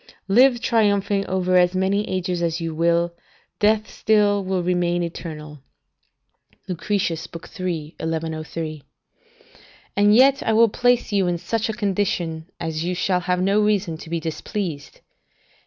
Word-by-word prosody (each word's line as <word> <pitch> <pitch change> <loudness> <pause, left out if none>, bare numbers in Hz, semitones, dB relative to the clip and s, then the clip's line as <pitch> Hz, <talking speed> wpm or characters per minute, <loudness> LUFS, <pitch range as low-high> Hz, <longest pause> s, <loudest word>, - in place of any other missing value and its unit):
["Live 245 +5 +5
triumphing 205 -3 +1
over 185 -1 +1
as 180 +1 +3
many 195 +3 0
ages 180 -1 -2
as 165 0 -1
you 165 -1 -3
will, 170 +1 +1 0.5
death 215 0 +2
still 205 -2 +2
will 185 -1 -1
remain 175 -1 0
eternal." 155 -3 -7 1.1
Lucretius, 180 -2 -2 0.3
iii. 165 -4 -3
1103] 160 -1 -4 1.1
"And 205 +1 +5
yet 270 +3 +5
I 225 - 0
will 230 +1 +5
place 245 +2 +1
you 195 -3 +2
in 175 -1 0
such 220 +6 -2
a - - -1
condition 185 -6 -2
as 160 -1 -3
you 180 +1 -2
shall 180 +1 +1
have 180 0 0
no 200 +2 +3
reason 205 -5 +1
to 160 - -10
be 170 0 -1
displeased. 160 -1 -5
180 Hz, 140 wpm, -22 LUFS, 165-205 Hz, 1.1 s, Live